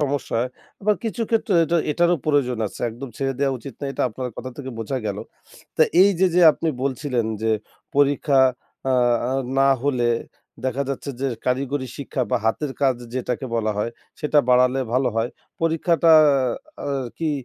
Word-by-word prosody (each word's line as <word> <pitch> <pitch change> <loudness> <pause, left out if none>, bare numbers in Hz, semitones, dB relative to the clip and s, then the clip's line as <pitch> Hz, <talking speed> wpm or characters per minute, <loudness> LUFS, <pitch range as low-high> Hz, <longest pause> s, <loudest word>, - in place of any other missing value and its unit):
সমস্যা 145 -2 -1
হয়, 125 +1 -2 0.3
আবার 210 +1 +2
কিছু 230 +1 -2
ক্ষেত্রে 225 -2 +1
এটা 170 +2 +1 0.2
এটারও 175 +2 +3
প্রয়োজন 130 -5 +1
আছে। - - -9
একদম 125 +4 -8
ছেড়ে 135 -1 -1
দেওয়া 135 -1 +1
উচিত 130 +2 -9
না, 145 - -4
এটা - - -2
আপনার 125 +3 -5
কথা 130 - -6
থেকে 130 -2 -6
বোঝা 115 +4 -2
গেল। 100 0 -3 0.6
তা - - +6 0.2
এই 200 - +6
যে, 190 - +6
যে 180 - +5
আপনি 165 - -3
বলছিলেন 130 -2 -1 0.2
যে, 110 - +1 0.5
পরীক্ষা 140 0 +3 0.5
আ - - +3 0.4
আ - - 0 0.3
না 135 0 +5
হলে 125 -4 +1 0.6
দেখা 130 +1 0
যাচ্ছে 140 +1 -4
যে, 135 - 0 0.2
কারিগরি 130 +1 -1
শিক্ষা 140 -1 -3
বা - - +3
হাতের 135 +5 0
কাজ 135 -2 +4 0.2
যেটাকে 125 +1 -2
বলা 110 -1 0
হয়, 110 +3 -1 0.3
সেটা 150 0 +2
বাড়ালে 125 +1 +4
ভালো 130 +1 +2
হয়। 115 +2 0 0.3
পরীক্ষাটা 165 0 +3 0.7
আ - - -2 0.3
কি, 160 -2 0
135 Hz, 170 wpm, -22 LUFS, 125-150 Hz, 0.7 s, তা